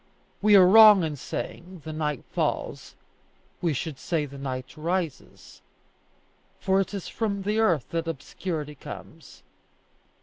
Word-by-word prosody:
We 210 0 +6
are 190 -2 +8
wrong 210 -1 +8
in 155 -2 -2
saying, 170 +5 -7
The 155 - -5
night 150 -4 -2
falls; - - -3 0.7
we 170 - +1
should 145 0 -4
say 160 -4 -1
the 140 -1 -10
night 130 -1 -5
rises, 170 0 -4 1.0
for 190 0 +2
it 195 - -4
is 195 - -5
from 200 -3 -2
the 210 +2 0
earth 170 - +2
that 165 0 -2
obscurity 155 0 -5
comes. 145 - -11
165 Hz, 135 wpm, -26 LUFS, 150-195 Hz, 1.0 s, are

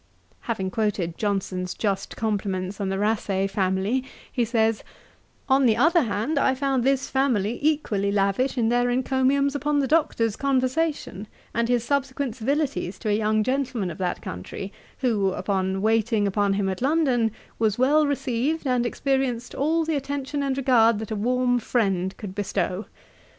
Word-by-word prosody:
Having 190 -5 -3
quoted 195 -5 -1
Johnson's 190 -3 -2
just 200 -3 -2
compliments 200 -3 -2
on 195 - -1
the 195 - -1
Rasay 200 -2 0
family, 195 +5 0 0.3
he 245 - +1
says, 225 -1 +1 0.6
'On 265 -1 +4
the 220 - +3
other 330 +7 +4
hand, 240 +5 -1
I 265 -1 +2
found 270 -2 0
this 270 +1 +1
family 240 -5 0
equally 255 -10 +1
lavish 200 +7 +1
in 225 -2 +2
their 245 +1 +2
encomiums 265 +2 +1
upon 295 +1 0
the 280 - +2
Doctor's 260 -8 +1
conversation, 265 - -1 0.3
and 235 +1 0
his 245 -2 +2
subsequent 270 -2 -1
civilities 270 - -1
to 215 - -3
a 205 - +3
young 215 0 +1
gentleman 255 -6 -1
of 160 - -10
that 180 -1 -2
country, 90 - -6 0.3
who, 205 -7 +1
upon 190 0 -1
waiting 220 -1 +2
upon 200 0 +1
him 195 0 0
at 190 +2 -3
London, 265 -5 +2 0.3
was 220 -2 +1
well 290 +4 +4
received, 280 +3 -1
and 250 -2 +1
experienced 265 -3 -1
all 320 +3 +1
the 320 -1 0
attention 280 0 -3
and 270 -1 -1
regard 235 -4 +4
that 220 +1 -6
a - - -1
warm 245 +3 +1
friend 195 -6 0
could 200 -3 -7
bestow. 200 -1 -2
230 Hz, 160 wpm, -24 LUFS, 200-270 Hz, 0.6 s, On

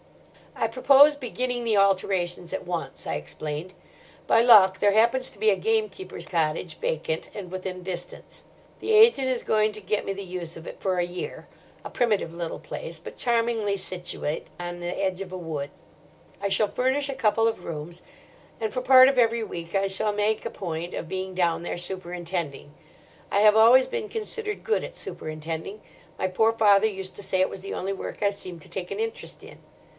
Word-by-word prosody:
"I 225 - 0
propose 275 +5 +6
beginning 250 -2 -3
the 225 -3 +2
alterations 190 -3 +1
at - - -4
once," 175 -2 -4
I - - -1
explained. 150 - -6 0.5
"By 225 - +5
luck 195 -6 +7
there 205 - +4
happens 235 +4 +3
to - - -16
be 220 - +4
a - - +3
gamekeeper's 200 -2 -2
cottage 160 0 -1
vacant 160 0 -2
and 190 -4 -7
within 185 -1 -5
distance. 180 -1 -7 0.4
The 440 - -1
agent 430 - +6
is 255 -2 -1
going 215 0 +2
to 215 - -8
get 205 +2 -1
me 195 - -2
the 200 +1 -6
use 175 -3 -6
of 165 - -11
it - - -8
for 185 -2 0
a 175 - +2
year—a 175 0 -9
primitive 210 -8 0
little 170 -1 -4
place, 165 -1 -7
but 170 - -10
charmingly 230 -4 +1
situate 180 -5 -4
on 175 0 -5
the 175 - -5 0.2
edge 190 0 -1
of 190 -2 -6
a 185 - -5
wood. 155 -5 -4 0.7
I 200 - 0
shall 210 +2 +2
furnish 260 +6 0
a 275 - -3
couple 225 0 +2
of 225 -5 -2
rooms; 165 +2 -6 0.6
and 220 -1 -2
for 255 - -1
part 255 0 +8
of 270 -1 +2
every 230 -1 +3
week 170 -4 -6
I 195 0 +2
shall 205 +2 -1
make 210 +1 0
a - - -1
point 170 -3 -5
of - - -5
being 190 +1 -4
down 170 -2 +1
there, - - -3
superintending. 175 -4 -4 0.6
I - - +3
have 210 0 +6
always 235 +4 +7
been 450 -3 -4
considered 430 -1 -5
good 450 - +1
at - - -8
superintending. 160 +6 -6 0.4
My - - 0
poor 220 +5 +3
father 210 -2 +5
used 190 -3 -6
to 205 - -6
say 185 - -1
it 185 - +3
was 190 - -7
the 195 - -6
only 195 +1 -2
work 195 - -7
I 200 - +3
seemed 185 -4 -9
to - - -12
take 185 -2 -5
an - - -4
interest 450 0 -5
in. - - -13
195 Hz, 195 wpm, -26 LUFS, 175-225 Hz, 0.7 s, part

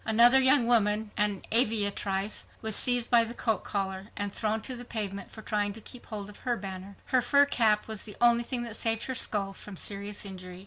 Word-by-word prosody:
Another 235 +4 +6
young 260 -1 +6
woman, 215 -2 +1
an 205 -2 -1
aviatrice, 205 -3 +1
was 220 -2 +2
seized 245 -1 +3
by 235 -1 +6
the 230 +1 -7
coat 225 -5 -1
collar 190 -1 -4
and 205 -1 -2
thrown 220 0 -1
to 255 - 0
the 245 - -8
pavement 200 -5 -4
for 220 - -12
trying 205 -1 -1
to 225 - -7
keep 240 +3 -11
hold 210 -3 -6
of 210 - -11
her 240 -2 -2
banner. 190 0 -8
Her 255 -2 +1
fur 285 +3 +4
cap 220 -6 +1
was 220 -2 -2
the 210 - -7
only 235 0 +4
thing 240 0 -3
that 230 -3 -5
saved 225 -1 +1
her 260 - -4
skull 205 -6 -1
from 195 0 -11
serious 200 +2 -3
injury. 185 -2 -8
215 Hz, 215 wpm, -28 LUFS, 200-235 Hz, -, Another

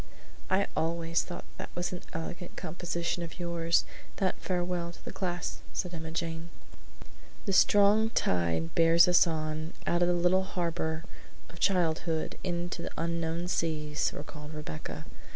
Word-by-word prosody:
"I 195 +1 +3
always 165 +1 +1
thought 175 - -7
that - - -5
was 175 0 -1
an 180 - -5
elegant 175 +2 -5
composition 170 +1 -2
of 170 +2 -6
yours 170 -1 +2 0.3
that 190 -2 +1
farewell 175 -1 -1
to - - -16
the - - -4
class," 175 -2 -3
said 180 -1 -2
Emma 160 -1 -4
Jane. 165 0 -3 1.0
"The 195 - 0
strong 205 +3 +6
tide 85 - +1
bears 165 +1 +6
us 175 0 +6
on, 155 0 -2
out 175 0 +2
of 175 - +5
the 175 - +3
little 175 +2 +4
harbor 165 -3 -2 0.5
of 170 - -13
childhood 165 -3 +1
into 175 -1 -2
the - - -4
unknown 170 +1 -1
seas," 155 -3 0
recalled 150 +1 -8
Rebecca. 115 - -6
170 Hz, 145 wpm, -30 LUFS, 160-175 Hz, 1.0 s, strong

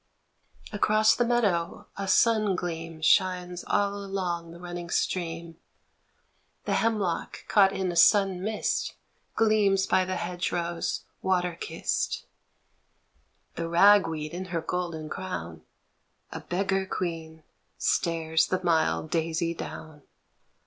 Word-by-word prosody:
Across 215 +1 +4
the 240 - +2
meadow 205 -9 0
a 200 0 -4
sun 215 0 +3
gleam 165 -2 -5
Shines 180 0 +2
all 200 0 0
along 180 -4 -3
the 170 +1 -11
running 175 -1 -7
stream, 170 -2 -2 1.1
The - - 0
hemlock 210 -7 -1
caught 195 -2 +5
in 190 -2 -2
a - - -6
sun 195 +1 +5
mist 215 +2 -1 0.4
Gleams 210 -3 +3
by 185 - +2
the 185 0 -3
hedge 180 0 -3
rose 170 -1 -2 0.2
water 180 -2 +1
kissed. - - -3 1.3
The 165 0 -4
rag 195 +2 +6
weed 155 -1 -5
in 185 +2 -4
her 170 -2 -3
golden 165 -2 -3
crown, 85 - -6 0.7
A - - -5
beggar 195 +1 -1
queen, 160 -4 -4 0.3
stares 160 -2 +1
the 185 - 0
mild 160 -2 +1
daisy 165 0 0
down. 155 -2 -8
180 Hz, 120 wpm, -27 LUFS, 165-195 Hz, 1.3 s, rag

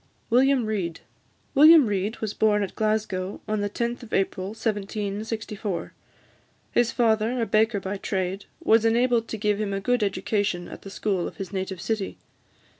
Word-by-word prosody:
WILLIAM 260 0 +4
REID. 185 -6 -3 0.5
William 305 +1 +8
Reid 205 +1 -1
was 215 -2 -2
born 210 -1 +2
at 195 - -5
Glasgow 215 -3 -1
on 215 -1 -1
the 205 - -1
10th 235 +4 -2
of 235 - -11
April 190 -1 0
1764. 210 -1 -3 0.8
His 240 -1 +2
father, 225 +1 +2
a 230 - +1
baker 220 -1 +2
by 195 +1 -4
trade, 190 0 -3 0.2
was 225 0 +5
enabled 230 0 +2
to 220 - -4
give 210 0 0
him 200 -2 -2
a 195 - -1
good 245 +4 +1
education 200 -2 -1
at - - -10
the 195 - -9
school 195 -3 -1
of - - -10
his 195 0 -6
native 190 -1 -3
city. 215 +1 -3
215 Hz, 165 wpm, -25 LUFS, 195-225 Hz, 0.8 s, William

